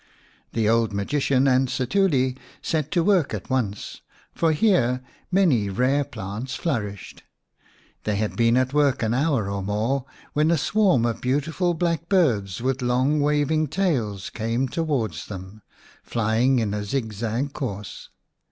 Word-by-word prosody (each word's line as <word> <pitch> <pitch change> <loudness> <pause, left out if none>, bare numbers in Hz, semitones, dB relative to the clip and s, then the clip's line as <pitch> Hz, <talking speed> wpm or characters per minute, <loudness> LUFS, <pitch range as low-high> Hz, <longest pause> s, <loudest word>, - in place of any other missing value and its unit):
The 110 -2 +1
old 115 -1 +2
magician 135 +6 +1
and 130 0 +3
Setuli 130 -1 +1 0.3
set 155 -2 -1
to 170 - +1
work 185 -6 +2
at - - -8
once, 110 -6 -2 0.3
for 165 -1 +2
here 150 - +2 0.3
many 155 - +3
rare 130 +8 +2
plants 110 +4 -6
flourished. 105 - -4 0.8
They 105 - 0
had 105 +1 -2
been 115 0 +3
at 130 +1 +1
work 145 -4 +2
an 110 +1 +1
hour 135 -5 +1
or 100 0 -3
more 110 +7 -1 0.3
when 150 +2 +2
a 170 - +3
swarm 180 - +2
of 115 -1 -2
beautiful 155 +7 0
black 170 0 -1
birds 115 - +1
with 130 0 0
long 130 +5 +2
waving 150 +1 +2
tails 130 - -1
came 115 +4 -1
towards 125 - -2
them, 95 +1 -9 0.4
flying 115 +4 +1
in 110 -4 0
a 105 0 -2
zigzag 115 +3 -2
course. 105 -7 -6
130 Hz, 145 wpm, -24 LUFS, 110-150 Hz, 0.8 s, and